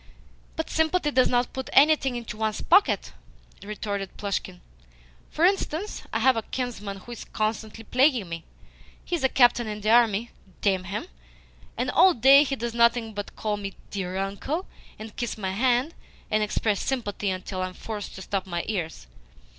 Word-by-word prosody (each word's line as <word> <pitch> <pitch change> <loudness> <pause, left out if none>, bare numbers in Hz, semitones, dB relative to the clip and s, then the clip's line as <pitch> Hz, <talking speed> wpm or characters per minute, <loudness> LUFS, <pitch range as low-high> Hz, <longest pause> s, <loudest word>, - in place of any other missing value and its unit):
"But - - -3
sympathy 320 -1 +1
does 255 -2 +4
not 245 0 +1
put 265 0 -5
anything 275 -3 +5
into 235 -3 -5
one's 215 -1 -1
pocket," 385 +4 +3 0.5
retorted 200 -1 -5
Plushkin. 195 -3 -3 0.7
"For 325 - +2
instance, 385 0 0
I - - 0
have 255 +3 +4
a 225 - 0
kinsman 220 -5 -4
who 195 +5 -12
is 235 - -7
constantly 215 +1 -3
plaguing 250 - +2
me. 165 -1 -6 0.6
He 350 - -1
is 330 - -4
a 265 - +4
captain 245 -3 +4
in 210 0 -5
the 215 +1 +1
army, 230 -1 +4 0.3
damn 190 -2 +1
him, 200 - -4 0.7
and - - 0
all 375 - +6
day 270 +4 +7
he 275 -1 -2
does 235 -2 -4
nothing 235 -1 +3
but 205 0 -6
call 210 -1 -2
me 200 -1 -6 0.2
'dear 185 -2 -3
uncle,' 200 - -3 0.3
and 215 0 -9
kiss 240 -3 -3
my 190 -3 -2
hand, 250 - +1 0.4
and 215 0 +2
express 210 -1 0
sympathy 210 -6 -2
until 185 0 -4
I 185 - 0
am 185 - -11
forced 210 -3 -6
to 190 - -8
stop 195 0 -3
my 175 -1 -2
ears. 170 - -3
220 Hz, 175 wpm, -26 LUFS, 200-255 Hz, 0.7 s, day